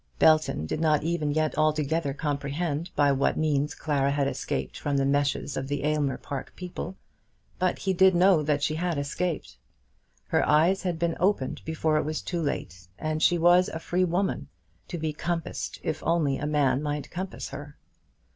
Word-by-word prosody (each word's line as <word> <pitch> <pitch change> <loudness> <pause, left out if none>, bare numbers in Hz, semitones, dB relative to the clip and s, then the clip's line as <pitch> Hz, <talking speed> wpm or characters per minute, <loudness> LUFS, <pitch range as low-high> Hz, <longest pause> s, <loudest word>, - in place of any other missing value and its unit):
Belton 155 - +4
did 80 - -3
not 155 -2 +3
even 165 -2 0
yet 155 +1 0
altogether 155 0 +1
comprehend 145 +3 -2
by 145 -1 +4
what 135 0 +1
means 150 -1 +1
Clara 140 -3 0
had 140 -1 +1
escaped - - -3
from 145 -1 -1
the 135 - +2
meshes 145 0 0
of 135 - -3
the 145 -1 -2
Aylmer 150 -2 +1
Park 140 -2 -6
people, 180 +1 -6 0.6
but 185 0 +1
he 190 - -1
did 190 0 +5
know 180 -2 +5
that 145 -1 0
she 155 - +1
had 170 0 -1
escaped. 150 - -3 0.7
Her - - +1
eyes 165 +6 +4
had 180 -3 -2
been 170 0 0
opened 180 -8 +1
before 160 -1 +1
it - - +1
was 155 0 -3
too 175 -2 -2
late, 90 - -4
and 155 0 -2
she 175 - +4
was 175 +2 +5
a - - -5
free 175 +3 0
woman, 185 +2 0 0.4
to 175 - -5
be 155 -1 -2
compassed 170 +2 -3
if 155 0 -2
only 155 -5 +1
a 150 - -2
man 140 -3 +2
might 150 -1 -3
compass 185 +2 -5
her. 145 +1 -9
155 Hz, 180 wpm, -27 LUFS, 145-170 Hz, 0.7 s, did